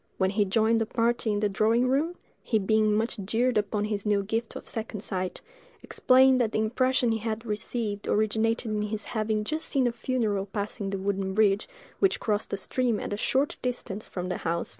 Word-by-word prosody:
When 190 0 +2
he 205 0 +2
joined 220 +3 +2
the 220 - 0
party 230 0 +1
in 205 0 0
the 210 - +3
drawing 220 +5 +2
room, 300 +7 +1 0.3
he 225 - +1
being 215 +1 +2
much 225 +1 -1
jeered 235 +5 +1
upon 210 0 0
this 205 -2 -2
new 205 -2 +1
gift 225 +3 -3
of - - -8
second 220 -2 -5
sight, 185 -3 -3 0.4
explained 260 0 +4
that 225 -2 0
the - - +1
impression 245 +2 +2
he 225 - 0
had 220 +1 -3
received 210 -1 -3
originated 220 +2 +1
in 210 0 0
his 210 0 -3
having 215 -1 -1
just 310 +8 -2
seen 270 -3 +1
a 240 - +2
funeral 225 -5 -1
passing 200 0 -4
the 195 - -2
wooden 190 0 -2
bridge 205 -1 +3 0.3
which 390 - +2
crossed 210 -1 -1
a 200 - -1
stream 240 +2 0
at - - -4
a - - 0
short 270 +6 +1
distance 235 -4 -4
from 180 -1 -4
the - - -2
house. 170 +1 -2
215 Hz, 205 wpm, -27 LUFS, 205-235 Hz, 0.4 s, explained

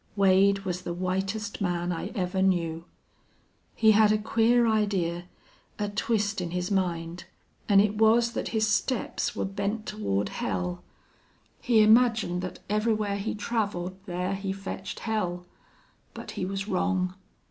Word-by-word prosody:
Wade 195 0 +4
was 180 -1 -2
the 175 -1 -4
whitest 195 +4 -2
man 175 -2 -1
I 175 +2 -3
ever 190 -1 -1
knew. 170 -3 0 0.9
He 220 -1 +5
had 215 0 +5
a 215 - +3
queer 230 +2 +3
idee 195 -6 0 0.5
a 205 -1 -2
twist 210 -1 -1
in 175 - -3
his 180 +2 -3
mind 175 -3 -1 0.4
an' 200 -1 +6
it 210 +1 +2
was 230 +2 +4
thet - - -3
his 220 -1 +1
steps 220 +3 -1
were - - -1
bent 200 +3 -3
toward 100 - -2
hell. 90 -3 -3 0.8
He 225 -3 +4
imagined 220 -5 +4
thet 185 - -5
everywhere 210 -1 0
he 200 +2 -3
traveled 205 -5 -2
there 180 +1 -2
he 195 0 -3
fetched 195 0 -6
hell. 180 -6 -2 0.7
But - - -7
he 185 - -3
was 195 +1 -4
wrong. 185 -1 0
195 Hz, 145 wpm, -27 LUFS, 180-215 Hz, 0.9 s, an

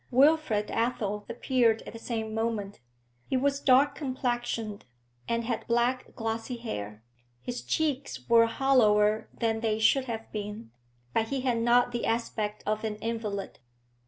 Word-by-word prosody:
Wilfrid 265 -5 +3
Athel 210 -3 -1
appeared 240 -3 +2
at - - -9
the 230 - -8
same 220 -2 -3
moment; 220 -3 -2 0.5
he 260 - +1
was 280 +1 +1
dark 275 +1 +5
complexioned 240 -6 -3 0.4
and 235 0 0
had 230 -1 -3
black, 240 +2 0
glossy 225 +1 -3
hair; 105 - -6 0.4
his 245 - -5
cheeks 275 - -2
were 230 0 +6
hollower 215 -5 +3
than 225 -1 -1
they 220 -1 0
should 255 +4 +3
have 225 -2 -5
been, 205 - -6 0.4
but 225 - +1
he 270 +2 -2
had 250 -3 +1
not 240 +1 +4
the 240 -1 -2
aspect 215 -2 -2
of 215 +1 -1
an 215 -1 -2
invalid. 215 -2 -4
230 Hz, 145 wpm, -28 LUFS, 215-250 Hz, 0.5 s, were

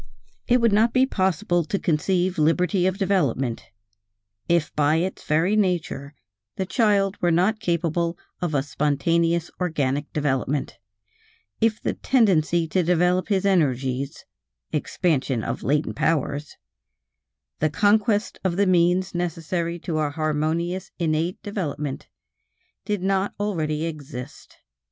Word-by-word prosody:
It 245 +1 +4
would 230 -3 +3
not 225 +3 +3
be 260 0 +4
possible 185 - 0
to 200 - -1
conceive 180 +2 0
liberty 180 +4 +2
of 190 0 -1
development, 145 - 0 0.8
if 170 -3 +1
by 150 +1 +3
its 180 +4 -2
very 165 +7 +2
nature 160 -8 -1 0.4
the 190 - -2
child 200 -2 +1
were 175 - +3
not 185 +6 +2
capable 170 -3 -1 0.2
of 170 -4 -1
a 135 - +2
spontaneous 165 +4 0
organic 145 -5 -1
development, 140 -4 -1 0.8
if 225 -1 +2
the - - -2
tendency 175 - +2
to 185 - +2
develop 180 +1 +2
his 200 -2 +1
energies 140 -6 0 0.5
(expansion 145 - 0
of - - -3
latent 150 +3 0
powers), 145 -2 -1 1.0
the 155 - +2
conquest 210 +4 +2
of 185 -3 0
the 200 - +3
means 180 +1 +2
necessary 170 0 -2
to 165 -2 -3
a 150 -1 +1
harmonious 155 +4 -1
innate 165 +1 -1
development, 150 -9 -4 0.8
did 205 -3 -2
not 195 +1 0
already 160 -7 -1
exist. 145 -4 -8
170 Hz, 125 wpm, -24 LUFS, 150-190 Hz, 1.0 s, It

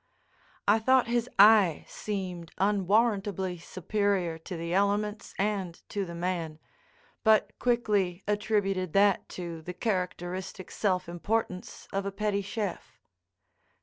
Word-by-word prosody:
I 210 +2 +5
thought 260 +3 +4
his 240 +1 0
eye 205 -5 +6
seemed 185 -5 -5
unwarrantably 200 -2 +1
superior 185 -1 -1
to 170 +2 -7
the 170 +1 -3
elements 205 +2 0
and 195 -4 -1
to 200 -1 -2
the 170 -1 -7
man, 170 -3 -2 0.7
but 220 -1 +4
quickly 205 -7 +1
attributed 200 -4 0
that 200 -1 +3
to 170 -3 -5
the 180 +3 -7
characteristic 185 -2 -3
self 185 -5 0
importance 180 +2 -3
of 195 0 -1
a - - -2
petty 200 0 -1
chef. 205 -1 -5
195 Hz, 115 wpm, -29 LUFS, 180-210 Hz, 0.7 s, eye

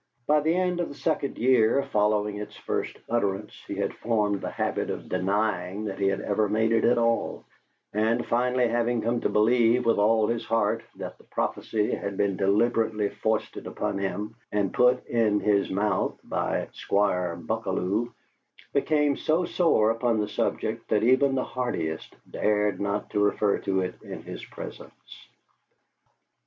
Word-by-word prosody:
By 150 +3 +4
the 160 +3 +1
end 180 -1 0
of 175 - -1
the 145 - -9
second 150 -2 -1
year 125 +1 +4
following 105 0 +2
its 105 - -7
first - - -3
utterance, 105 -3 -1
he - - -4
had - - -1
formed 105 -4 0
the - - -3
habit - - -2
of - - -5
denying 100 0 -1
that 100 -2 -5
he 100 - +2
had 95 0 0
ever 105 0 0
made 110 +2 +2
it 115 - +3
at 120 - +4
all, 115 0 0 0.5
and, 110 +3 +1
finally 125 +1 +2
having 120 0 0
come 115 +1 0
to - - +1
believe 120 +2 +3
with 115 -2 +3
all 110 +1 +4
his 115 +1 -1
heart 115 -2 +1
that - - -7
the - - -18
prophecy 105 -1 -1
had 100 -1 -4
been 100 -1 +1
deliberately 105 +2 +1
foisted 110 +1 -2
upon 100 - -3
him 100 +2 -3 0.2
and 100 -2 0
put 125 +1 +3
in 110 -3 +2
his 100 -1 +2
mouth 100 0 0
by - - -2
Squire 90 -4 0
Buckalew, 95 +6 -2 0.6
became 145 0 +2
so 165 +3 +1
sore 135 -12 +3
upon 115 0 +1
the 105 -1 0
subject 110 +2 -2
that 105 -1 +2
even 130 +3 +4
the 130 - +1
hardiest 85 -11 -3
dared 105 -1 0
not 100 +1 -2
refer 105 0 +2
to 95 -1 0
it 90 0 -5
in - - -8
his - - -8
presence. - - -11
110 Hz, 160 wpm, -26 LUFS, 100-120 Hz, 0.6 s, By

